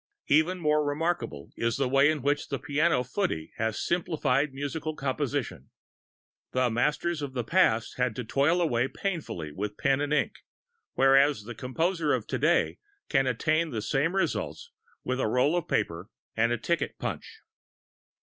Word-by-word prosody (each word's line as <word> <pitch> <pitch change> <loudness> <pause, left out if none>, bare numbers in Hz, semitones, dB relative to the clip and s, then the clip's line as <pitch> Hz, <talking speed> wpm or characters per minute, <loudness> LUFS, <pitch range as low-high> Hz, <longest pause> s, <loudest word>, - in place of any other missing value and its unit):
Even 160 +5 +3
more 150 -3 +2
remarkable 145 - -2
is 115 0 0
the 135 -2 +1
way 135 +3 +4
in 155 -4 -1
which 145 +1 0
the - - -2
piano 150 -2 +1
footy 125 - -2
has 110 -1 -1
simplified 150 -5 +1
musical 145 +3 -4
composition. 140 -1 -3 0.8
The 130 -2 +2
masters 150 +7 0
of 140 -2 -4
the 125 -2 -2
past 115 -7 +2
had 125 -3 0
to 125 - -3
toil 145 +9 +2
away 125 -6 +1
painfully 150 - -4
with 105 +6 -5
pen 135 -1 +2
and 145 0 -2
ink; 150 - +1 0.6
whereas 135 -2 +4
the 120 +3 -7
composer 160 - 0
of - - -1
today - - +1 0.3
can 135 -3 +2
attain 155 +7 +1
the 115 -6 -3
same 150 - 0
results 470 - -2 0.3
with 130 - -2
a 130 - +1
roll 125 +8 +2
of 175 - -1
paper 85 -5 -1 0.3
and 115 +1 +2
a 120 - +1
ticket 170 +6 -1
punch. 445 - -6
140 Hz, 155 wpm, -28 LUFS, 125-160 Hz, 0.8 s, way